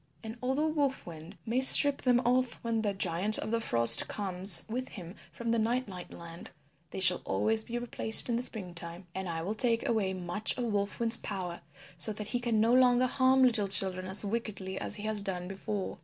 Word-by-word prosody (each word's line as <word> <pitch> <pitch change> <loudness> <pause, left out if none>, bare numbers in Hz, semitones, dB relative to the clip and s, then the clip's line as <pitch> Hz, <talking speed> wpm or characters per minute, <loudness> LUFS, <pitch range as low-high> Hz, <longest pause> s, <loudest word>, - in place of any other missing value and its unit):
And 220 0 -9
although 265 +5 -2
Wolf 285 -3 -3
Wind 165 +3 -13
may 240 +3 -2
strip 280 +1 +9
them 245 -1 +1
off 250 0 -1
when 230 -1 -3
the 210 -2 -2
Giant 190 +2 +2
of - - -6
the 230 0 -2
Frost 115 - +4
comes 190 -2 +1
with 250 +3 -6
him 180 -3 -12 0.2
from 235 -1 -6
the 230 - -1
Night 240 +3 -2
Night 180 -3 -11
Land 170 0 -13 0.4
they - - -8
shall 185 -1 +2
always 220 0 -2
be 240 - -6
replaced 240 -2 +1
in 240 - -2
the 235 - -3
spring 200 -8 -8
time. 170 +1 -10
And 190 -1 -7
I 165 -1 -6
will 200 +5 -4
take 230 +1 +1
away 200 -5 -2
much 180 +4 -4
of 250 - -4
Wolf 200 0 -4
Wind's 230 0 +5
power 185 -6 -8 0.4
so 215 +5 +3
that 210 0 -9
he 245 - -3
can 235 -3 -2
no 225 +2 +1
longer 250 0 +2
harm 260 +1 +1
little 225 -5 +1
children 185 -1 +4
as 190 +2 +4
wickedly 200 -3 -6
as - - -3
he 205 - -8
has 215 -1 -2
done 180 -2 -6
before." 195 0 -7
215 Hz, 215 wpm, -28 LUFS, 185-240 Hz, 0.4 s, strip